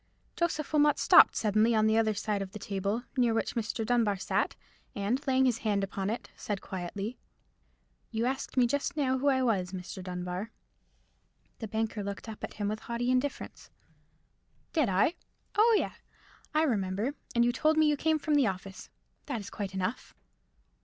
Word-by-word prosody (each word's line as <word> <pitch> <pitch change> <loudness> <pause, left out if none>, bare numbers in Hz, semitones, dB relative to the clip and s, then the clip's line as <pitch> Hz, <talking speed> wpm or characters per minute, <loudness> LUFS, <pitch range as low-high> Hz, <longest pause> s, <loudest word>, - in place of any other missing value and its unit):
Joseph 315 -4 -1
Wilmot 295 -1 +4
stopped - - +7
suddenly 215 +2 +3
upon 215 0 +3
the 220 0 +3
other 220 -1 +2
side 205 0 -1
of 190 0 -6
the - - -5
table, 200 +3 -2
near 240 -3 +3
which 225 - -1
Mr. 225 0 -2
Dunbar 225 -4 +2
sat, 190 - -1 0.4
and, 210 +7 0
laying 265 0 +4
his 245 -3 +1
hand 205 -3 0
upon 195 0 -2
it, 230 - -4
said 205 -2 -3
quietly— 195 +6 -5 0.9
"You 225 +1 -1
asked 265 +1 -3
me 250 - +6
just 285 +5 -1
now 260 -3 +1
who 285 - 0
I 260 -2 +3
was, 195 -6 0
Mr. 185 0 -6
Dunbar." 180 +3 -4 1.1
The 225 - -4
banker 220 0 -2
looked 200 +2 -6
up 220 -1 -8
at - - -5
him 205 -1 -2
with 215 +1 -2
haughty 235 +2 -2
indifference. 255 +3 -2 1.0
"Did 305 - +2
I? 195 - +3 0.4
Oh, 450 +1 +5
yea, - - -1 0.6
I 310 - +4
remember; 210 -1 0 0.2
and 235 0 +4
you 240 - +3
told 310 +5 +2
me 315 - +5
you 300 -1 +3
came 315 +2 +1
from 305 0 -1
the 285 -5 +4
office. 190 0 -6 0.4
That 270 -6 -2
is 200 - -8
quite 195 -2 -5
enough." 185 -1 -3
225 Hz, 180 wpm, -30 LUFS, 200-260 Hz, 1.1 s, stopped